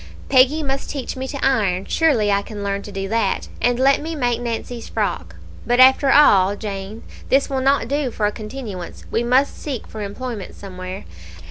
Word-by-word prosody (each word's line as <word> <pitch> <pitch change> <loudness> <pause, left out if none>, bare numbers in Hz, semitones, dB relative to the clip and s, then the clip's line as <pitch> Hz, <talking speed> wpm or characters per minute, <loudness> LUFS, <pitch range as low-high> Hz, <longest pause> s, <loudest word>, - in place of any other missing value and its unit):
Peggy 275 +4 +4
must 270 -1 -3
teach 275 -3 -4
me 260 0 -4
to 280 - -5
iron 200 -8 +1
surely 250 -11 +2
I 200 0 +2
can 205 0 -8
learn 200 0 -2
to 205 - -10
do 195 0 -4
that 225 +1 0
and 245 0 +2
let 270 +2 +3
me 320 +2 -4
make 245 -4 0
Nancy's 235 0 -5
frock. - - -3 0.3
But, 245 +1 +1
after 265 +1 +6
all, 200 -9 +5
Jane, 200 +1 -6 0.3
this 275 +1 +2
will 265 -1 0
not 275 +1 +2
do 285 -1 -1
for 220 -2 -2
a 205 - +1
continuance; 215 -5 -8
we 230 - +1
must 255 +4 +2
seek 270 -6 -4
for 215 - -8
employment 210 0 -6
somewhere. 185 -1 -8
240 Hz, 190 wpm, -21 LUFS, 205-270 Hz, 0.3 s, after